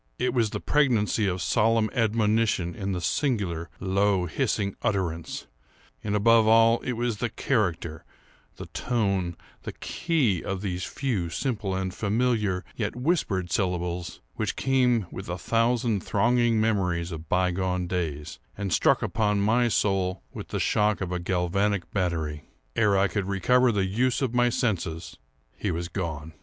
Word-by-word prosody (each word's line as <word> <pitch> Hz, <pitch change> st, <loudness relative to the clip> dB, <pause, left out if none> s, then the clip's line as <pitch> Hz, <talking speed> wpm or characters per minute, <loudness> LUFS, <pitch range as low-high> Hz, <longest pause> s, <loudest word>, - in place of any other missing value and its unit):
It 125 Hz, -1 st, 0 dB
was 115 Hz, -4 st, +2 dB
the -, -, -4 dB
pregnancy 115 Hz, -7 st, +2 dB
of 90 Hz, -2 st, -1 dB
solemn 110 Hz, +4 st, +2 dB
admonition 110 Hz, -5 st, +1 dB
in 100 Hz, +3 st, -3 dB
the 90 Hz, -2 st, -2 dB
singular, 90 Hz, -, -1 dB
low, 95 Hz, 0 st, +1 dB
hissing 100 Hz, -, -1 dB
utterance; 85 Hz, -5 st, -2 dB, 0.6 s
and, 105 Hz, -1 st, -1 dB
above 110 Hz, +1 st, +5 dB
all, 115 Hz, +1 st, +5 dB
it 125 Hz, -, -3 dB
was 120 Hz, -2 st, -1 dB
the 120 Hz, +2 st, -1 dB
character, 90 Hz, -, -1 dB, 0.5 s
the -, -, -8 dB
tone, 100 Hz, -8 st, -1 dB, 0.2 s
the -, -, -6 dB
key, 140 Hz, -, 0 dB
of 95 Hz, -1 st, -3 dB
those 90 Hz, -3 st, -3 dB
few, 110 Hz, -11 st, -2 dB
simple, 100 Hz, +1 st, -2 dB
and 95 Hz, -1 st, -2 dB
familiar, 105 Hz, -3 st, 0 dB
yet 105 Hz, -1 st, -2 dB
whispered 125 Hz, -, 0 dB
syllables, 90 Hz, -2 st, -2 dB
which -, -, -2 dB
came 125 Hz, -5 st, +2 dB
with 95 Hz, -, -7 dB
a 90 Hz, -, -2 dB
thousand 115 Hz, +1 st, +1 dB
thronging 120 Hz, +2 st, +2 dB
memories 90 Hz, -6 st, 0 dB
of 80 Hz, -1 st, -8 dB
bygone 90 Hz, 0 st, 0 dB
days, 80 Hz, -4 st, -3 dB, 0.2 s
and 100 Hz, -3 st, -2 dB
struck -, -, +3 dB
upon 105 Hz, -2 st, +1 dB
my 115 Hz, +4 st, +3 dB
soul 95 Hz, -4 st, 0 dB
with -, -, -7 dB
the -, -, -3 dB
shock 105 Hz, 0 st, +2 dB
of 90 Hz, -2 st, -3 dB
a 90 Hz, -, -1 dB
galvanic 95 Hz, +2 st, 0 dB
battery. 80 Hz, -6 st, -2 dB, 0.3 s
Ere 105 Hz, -4 st, +3 dB
I 100 Hz, +1 st, +4 dB
could 100 Hz, +1 st, -2 dB
recover 125 Hz, +6 st, +3 dB
the 100 Hz, -3 st, +1 dB
use 125 Hz, +8 st, 0 dB
of 125 Hz, -3 st, -1 dB
my 120 Hz, 0 st, +3 dB
senses 105 Hz, -10 st, -2 dB, 0.4 s
he 105 Hz, -, -3 dB
was 85 Hz, 0 st, -3 dB
gone. 80 Hz, -4 st, -4 dB
100 Hz, 150 wpm, -26 LUFS, 90-115 Hz, 0.6 s, above